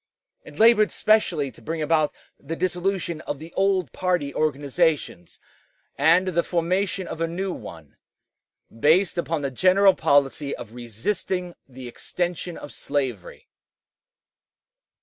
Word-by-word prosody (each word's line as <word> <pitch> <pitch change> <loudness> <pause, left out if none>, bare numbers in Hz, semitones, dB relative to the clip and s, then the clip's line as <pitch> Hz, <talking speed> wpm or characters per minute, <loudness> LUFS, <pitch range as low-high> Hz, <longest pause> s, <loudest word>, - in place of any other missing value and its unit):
It - - -13
labored 220 -2 +6
specially 175 -10 +2
to - - -18
bring 160 +8 -4
about 155 -1 +2 0.3
the 165 - -5
dissolution 180 -2 -2
of 145 - -2
the 160 +3 -11
old 190 - +1
party 180 -7 -1
organizations 145 - -1 0.6
and 170 +6 +4
the 170 -1 +1
formation 185 +3 -1
of 165 - -6
a 165 - +1
new 185 +3 -3
one, 80 - -11 0.8
based 170 - +3
upon 165 -3 -2
the 140 - -2
general 185 +6 +5
policy 140 -2 +1
of 115 -2 -10
resisting 175 - -3 0.2
the 130 -1 -9
extension 175 +6 -4
of 145 - -10
slavery. 130 -9 -4
165 Hz, 125 wpm, -24 LUFS, 140-185 Hz, 0.8 s, labored